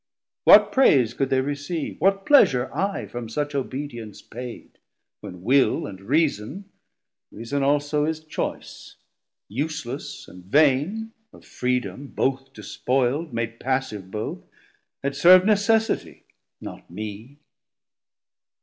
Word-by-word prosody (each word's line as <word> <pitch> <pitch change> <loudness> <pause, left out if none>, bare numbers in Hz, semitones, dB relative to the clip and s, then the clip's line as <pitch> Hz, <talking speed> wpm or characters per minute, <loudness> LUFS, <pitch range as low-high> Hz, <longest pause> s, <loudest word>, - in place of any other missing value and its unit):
what - - +8
praise 130 - +4
could 135 +1 -1
they 130 -1 +2
receive? 145 +4 -4
What 195 +2 +2
pleasure 135 - +4
I 200 +1 -1
from 120 -2 -7
such 145 +5 -3
obedience 130 -5 -5
paid, 125 0 -10 0.4
When 90 0 -10
Will 135 +5 +3
and 95 -2 -9
Reason 145 - -1 0.7
(Reason 115 +6 -4
also 145 +1 +1
is 160 0 -2
choice) 155 - -6 0.5
Useless 140 +2 -5
and 90 0 -13
vain, 150 - +2 0.2
of - - -17
freedom 125 +2 -3
both 135 0 -2
despoild, 130 - -1
Made 115 0 -4
passive 130 -8 -2
both, 105 +2 -4 0.6
had 140 0 -1
servd 180 +5 +7
necessitie, 220 +2 +1
110 - - -44 0.4
Not - - -10
mee. 110 +8 -8
135 Hz, 115 wpm, -24 LUFS, 120-155 Hz, 0.7 s, what